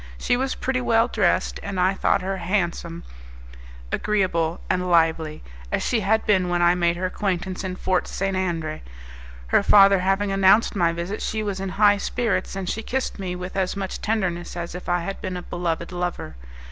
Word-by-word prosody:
She 245 Hz, -, +1 dB
was 260 Hz, +1 st, -1 dB
pretty 255 Hz, -1 st, -1 dB
well 230 Hz, -1 st, +3 dB
dressed, -, -, +1 dB
and 195 Hz, -2 st, -4 dB
I 185 Hz, +2 st, +3 dB
thought 190 Hz, -, +1 dB
her 190 Hz, +1 st, -2 dB
handsome, 170 Hz, -2 st, -2 dB, 0.9 s
agreeable, 180 Hz, -6 st, 0 dB
and 180 Hz, 0 st, 0 dB
lively, 160 Hz, -2 st, +2 dB, 0.3 s
as -, -, 0 dB
she 235 Hz, -, +1 dB
had 220 Hz, +2 st, +1 dB
been 190 Hz, -4 st, +2 dB
when 175 Hz, 0 st, +1 dB
I 175 Hz, 0 st, +5 dB
made 175 Hz, -1 st, +1 dB
her 185 Hz, -, -2 dB
acquaintance 185 Hz, 0 st, -2 dB
in 185 Hz, -1 st, -3 dB
Fort 185 Hz, -1 st, 0 dB
St. 195 Hz, 0 st, -2 dB
Andre. 165 Hz, -4 st, -2 dB, 0.7 s
Her -, -, +4 dB
father 195 Hz, -1 st, +6 dB
having 195 Hz, +2 st, +1 dB
announced 195 Hz, +3 st, +4 dB
my 170 Hz, -3 st, +2 dB
visit, 170 Hz, +5 st, -4 dB
she 215 Hz, 0 st, -2 dB
was 200 Hz, -2 st, -3 dB
in 195 Hz, 0 st, -3 dB
high 205 Hz, -1 st, +5 dB
spirits, 225 Hz, 0 st, -1 dB
and 195 Hz, -2 st, -4 dB
she 220 Hz, -, -2 dB
kissed 260 Hz, -1 st, -3 dB
me 180 Hz, -2 st, -3 dB
with 180 Hz, +1 st, -7 dB
as 190 Hz, 0 st, -1 dB
much 190 Hz, -2 st, -4 dB
tenderness 180 Hz, -6 st, -2 dB
as 170 Hz, -1 st, -5 dB
if 180 Hz, 0 st, -7 dB
I 175 Hz, 0 st, +1 dB
had 195 Hz, +3 st, -5 dB
been 185 Hz, -1 st, -4 dB
a 180 Hz, -, -6 dB
beloved 170 Hz, -1 st, -3 dB
lover. 175 Hz, -, -4 dB
185 Hz, 190 wpm, -23 LUFS, 175-200 Hz, 0.9 s, father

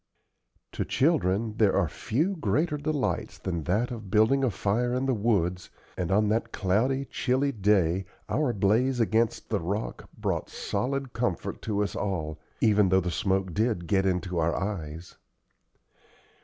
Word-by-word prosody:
To -, -, -2 dB
children 115 Hz, -, +1 dB
there 105 Hz, -3 st, +4 dB
are -, -, +3 dB
few 160 Hz, -, -1 dB
greater 150 Hz, -, 0 dB
delights 145 Hz, -1 st, -2 dB
than 85 Hz, -5 st, -3 dB
that 110 Hz, +7 st, +1 dB
of 110 Hz, -5 st, -7 dB
building 110 Hz, +7 st, +4 dB
a 130 Hz, -, +3 dB
fire 115 Hz, +5 st, 0 dB
in 130 Hz, +1 st, 0 dB
the 135 Hz, -, +2 dB
woods, 95 Hz, -6 st, 0 dB, 0.3 s
and 90 Hz, 0 st, -2 dB
on 105 Hz, +2 st, +3 dB
that 115 Hz, +1 st, 0 dB
cloudy, 125 Hz, +8 st, +1 dB
chilly 135 Hz, +2 st, 0 dB
day 95 Hz, -5 st, +2 dB, 0.2 s
our 145 Hz, -2 st, +1 dB
blaze 120 Hz, +5 st, +2 dB
against 115 Hz, 0 st, +1 dB
the -, -, +2 dB
rock 100 Hz, +6 st, -4 dB
brought -, -, -2 dB
solid 130 Hz, +5 st, -2 dB
comfort 115 Hz, -7 st, -2 dB
to 105 Hz, -2 st, 0 dB
us 100 Hz, -, -4 dB
all, 80 Hz, -6 st, -3 dB, 0.2 s
even 105 Hz, -3 st, +4 dB
though 95 Hz, 0 st, +5 dB
the 90 Hz, -1 st, -2 dB
smoke 95 Hz, -1 st, 0 dB
did 110 Hz, -4 st, 0 dB
get 95 Hz, +2 st, +2 dB
into 90 Hz, -1 st, -1 dB
our 85 Hz, +1 st, +1 dB
eyes. 85 Hz, -6 st, -5 dB
105 Hz, 155 wpm, -27 LUFS, 95-125 Hz, 0.3 s, though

